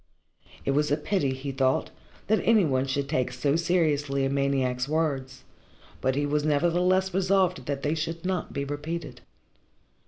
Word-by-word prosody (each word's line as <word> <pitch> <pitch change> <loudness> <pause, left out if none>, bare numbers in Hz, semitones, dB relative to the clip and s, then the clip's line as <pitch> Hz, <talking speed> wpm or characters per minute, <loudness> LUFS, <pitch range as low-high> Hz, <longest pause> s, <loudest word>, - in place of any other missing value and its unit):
It - - +1
was 150 +2 +1
a 145 - +3
pity, 150 -3 0
he 135 +1 -5
thought, 130 -1 +1 0.3
that 220 +1 +2
any 220 -5 +4
one 135 -2 0
should 140 +1 -1
take 130 -4 0
so 140 +3 0
seriously 150 -5 +1
a 135 - -1
maniac's 135 -2 0
words, 140 -4 -1 0.6
but 130 0 +1
he 145 +1 0
was 145 +1 0
nevertheless 175 +5 +2
resolved 185 -7 +1
that 140 -1 -3
they 150 - +1
should 165 +2 -4
not 185 -2 -2
be 140 0 -3
repeated. 150 +4 -5
145 Hz, 160 wpm, -27 LUFS, 135-170 Hz, 0.6 s, any